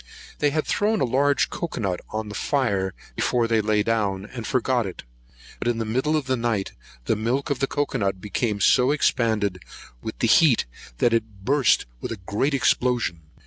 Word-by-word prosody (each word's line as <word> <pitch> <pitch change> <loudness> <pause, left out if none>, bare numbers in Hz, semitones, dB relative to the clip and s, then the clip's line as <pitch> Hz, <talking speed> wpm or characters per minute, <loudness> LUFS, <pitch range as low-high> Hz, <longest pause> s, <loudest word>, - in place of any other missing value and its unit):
They 145 - +3
had 155 +2 -1
thrown 215 +1 +1
a - - +2
large 140 +3 +2 0.3
nut 95 -6 -1
on 110 0 -4
the - - -7
fire 100 -6 0 0.2
before 120 - +1
they 115 -1 +2
lay 105 0 +1
down, 105 -4 0
and 115 +1 -7
forgot 125 -3 +1
it; 90 - -8 0.6
but - - -3
in 120 -1 +1
the 115 - -2
middle 130 +8 0
of 150 - -2
the 130 0 +1
night, 115 -5 -1 0.3
the - - +2
milk 125 +7 -1
of 140 - -1
the 135 - +1
cocoa 145 -2 -1
nut 95 -2 -1
became 105 +1 -2
so 125 +5 +4
expanded 110 - +1 0.4
with 110 - -6
the 115 - +1
heat, 135 +2 +5 0.3
that 120 - +2
it 110 -4 -2
burst 135 -1 +3
with - - -5
a 115 - -4
great 135 +10 0
explosion. 120 -8 +1
115 Hz, 185 wpm, -24 LUFS, 105-135 Hz, 0.6 s, heat